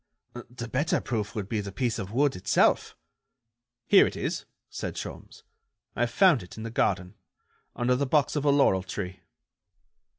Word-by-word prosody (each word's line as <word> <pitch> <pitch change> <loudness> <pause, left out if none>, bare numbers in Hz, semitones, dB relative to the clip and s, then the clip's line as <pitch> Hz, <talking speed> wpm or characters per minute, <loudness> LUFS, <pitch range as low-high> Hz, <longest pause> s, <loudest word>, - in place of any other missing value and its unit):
"The 120 -1 -7
better 140 +7 0
proof 110 -2 -3
would 105 -3 -3
be 105 0 -1
the 100 -1 -6
piece 115 +4 -1
of 100 -1 -5
wood 140 +4 +2
itself." 95 +1 +2 0.9
"Here 200 - +6
it - - -6
is," - - -3 0.2
said - - -5
Sholmes, - - -8 0.5
"I - - +1
found 180 - +4
it 90 - -12
in 110 - -6
the 115 - -5
garden, 95 -4 0 0.6
under 125 +1 +1
the 140 +2 -1
box 150 +2 +2
of 145 - 0
a 145 - +3
laurel 140 -10 +4
tree." 95 0 -6
115 Hz, 165 wpm, -27 LUFS, 100-140 Hz, 0.9 s, Here